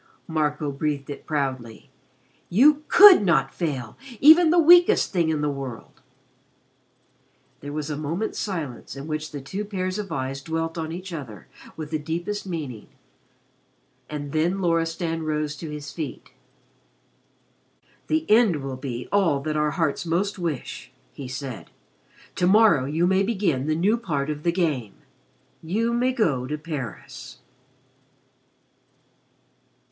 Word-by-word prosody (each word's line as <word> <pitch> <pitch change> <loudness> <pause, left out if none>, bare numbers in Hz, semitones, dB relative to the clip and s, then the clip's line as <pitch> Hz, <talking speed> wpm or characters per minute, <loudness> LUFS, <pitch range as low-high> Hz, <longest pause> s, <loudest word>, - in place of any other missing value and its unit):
Marco 150 -2 -1
breathed 140 0 -3
it 140 - -9
proudly. 130 -6 -3 0.6
"You 285 +10 +5
could 400 - +9
not 170 -8 +2
fail 135 -10 -4 0.2
even 320 +3 +7
the 345 - +3
weakest 345 -3 +6
thing 170 -3 +2
in 155 -2 0
the 150 - 0
world." 135 -5 -8 1.6
There 145 - -7
was 150 0 -4
a - - -2
moment's 165 +8 -3
silence 155 - -5
in 140 +1 -7
which 155 0 -4
the 145 - -6
two 190 +10 -5
pairs 185 -1 -3
of 200 -4 -6
eyes 135 -1 -3
dwelt 165 +2 -3
on 160 -1 -4
each 180 +1 -7
other 115 - -8 0.3
with 155 -1 -7
the 155 - -1
deepest 175 +6 -4
meaning, 145 - -6 1.2
and 145 -2 -5
then 170 +5 0
Loristan 165 -1 -1
rose 150 -1 -2
to 160 - -7
his 150 -1 -7
feet. 155 -3 -7 1.8
"The 315 +1 0
end 210 - +4
will 135 -1 -5
be 125 -2 -6
all 190 -8 +2
that 155 +1 -3
our 150 0 +1
hearts 160 -2 -1
most 185 +4 -1
wish," 165 -7 -5 0.2
he 135 - -8
said. 130 - -7 0.7
"To 180 - +2
morrow 200 -9 +5
you 155 +5 0
may 190 +1 +3
begin 190 - 0
the 155 - +1
new 200 +8 +2
part 155 -10 -2
of 150 -1 -6
'the 170 - +1
Game.' 150 - -1 0.7
You 220 +8 -1
may 250 +2 +1
go 150 - 0
to 150 +2 -3
Paris." 145 - -7
160 Hz, 140 wpm, -24 LUFS, 140-190 Hz, 1.8 s, could